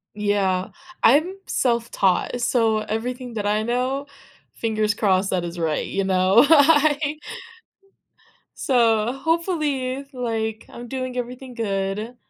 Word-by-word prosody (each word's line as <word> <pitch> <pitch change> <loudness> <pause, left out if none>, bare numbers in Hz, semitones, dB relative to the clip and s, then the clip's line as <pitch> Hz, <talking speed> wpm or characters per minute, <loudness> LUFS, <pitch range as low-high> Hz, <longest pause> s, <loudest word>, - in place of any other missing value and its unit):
Yeah. 200 -3 0 0.3
I'm 310 +10 +4
self-taught, 235 -3 0
so 225 -2 +2
everything 240 +4 -4
that 210 -2 -3
I 210 +1 +1
know 255 +4 -1 0.5
fingers 215 -2 0
crossed 195 -2 +1
that 180 -2 0
it's 170 0 -6
right, 160 -2 -1
you 195 - -2
know? 190 +6 +4
I 300 -1 +4 1.3
so, 230 -2 +2
hopefully, 280 -3 -1
like, 225 -3 -3
I'm 240 0 -9
doing 255 0 -4
everything 250 +1 -6
good. 205 +2 -3
235 Hz, 110 wpm, -22 LUFS, 210-265 Hz, 1.3 s, I'm